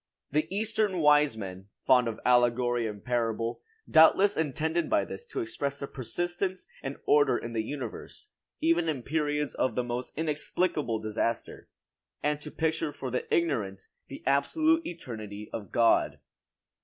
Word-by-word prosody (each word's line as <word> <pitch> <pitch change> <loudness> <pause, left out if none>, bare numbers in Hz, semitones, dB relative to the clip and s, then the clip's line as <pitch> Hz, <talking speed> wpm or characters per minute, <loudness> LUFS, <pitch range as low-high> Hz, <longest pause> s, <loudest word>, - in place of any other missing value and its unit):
The 155 +2 +1
eastern 210 -1 0
wise 150 -5 +4
men, 95 -2 -7 0.2
fond 125 -2 +5
of 115 -1 -4
allegory 120 -1 +3
and 105 -2 -8
parable, 115 -1 -1 0.3
doubtless 190 +5 +6
intended 160 +2 -1
by 100 - +2
this 95 0 -8
to - - -3
express 140 +5 -3
the - - -3
persistence 175 - -3 0.2
and 135 0 -5
order 145 -4 +4
in 115 - -6
the 115 - 0
universe, 125 0 -7 0.3
even 165 0 +3
in 135 -6 -2
periods 150 0 -1
of 130 -4 0
the 125 - +1
most 120 +2 -5
inexplicable 150 -4 0
disaster; 110 +2 -3 0.5
and 150 0 0
to 150 - -7
picture 160 0 -1
for 130 -3 -6
the 125 - -3
ignorant 110 - 0 0.2
the 135 - -9
absolute 315 - +3
eternity 110 - -7
of 100 -5 -6
God. 115 -1 +3
140 Hz, 145 wpm, -29 LUFS, 115-160 Hz, 0.5 s, doubtless